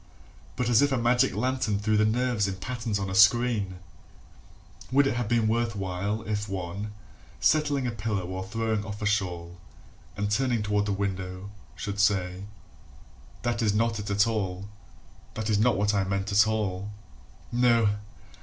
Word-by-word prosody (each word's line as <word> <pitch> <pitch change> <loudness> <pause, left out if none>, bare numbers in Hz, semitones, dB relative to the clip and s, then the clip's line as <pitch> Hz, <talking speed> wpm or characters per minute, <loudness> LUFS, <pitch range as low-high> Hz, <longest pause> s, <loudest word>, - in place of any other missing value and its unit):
But 125 - -1
as 120 0 +5
if 145 0 +3
a 135 - +2
magic 120 -1 +2
lantern 125 -2 0
threw 105 +1 0
the 105 0 +4
nerves 120 -2 +1
in 95 - -3
patterns 115 +1 -3
on 100 -1 -3
a 95 - -4
screen: 105 -2 +4 1.1
Would 140 +2 +5
it 135 - +1
have 120 -2 -2
been 115 -1 +2
worth 115 0 0
while 100 +2 -2
If 105 -1 -3
one, 100 +2 -4 0.5
settling 145 -4 +2
a 120 - 0
pillow 105 -4 -2
or 95 +1 -4
throwing 110 +1 -2
off 105 0 -6
a - - 0
shawl, 90 -5 -1 0.6
And 100 0 -1
turning 120 -1 +1
toward 105 0 0
the - - 0
window, 95 -1 -3 0.2
should 100 +2 -5
say: 95 -1 +1 1.0
"That 120 -1 0
is 105 -2 +2
not 115 0 +1
it 105 - -5
at 100 +1 +3
all, 100 -4 -2 0.7
That 110 0 -2
is 105 - +2
not 120 0 +3
what 105 +1 +1
I 100 -1 +2
meant, 100 +1 -2
at 105 +2 +5
all."..... 105 -3 -2 0.6
No! 115 -4 +3
105 Hz, 170 wpm, -27 LUFS, 100-115 Hz, 1.1 s, as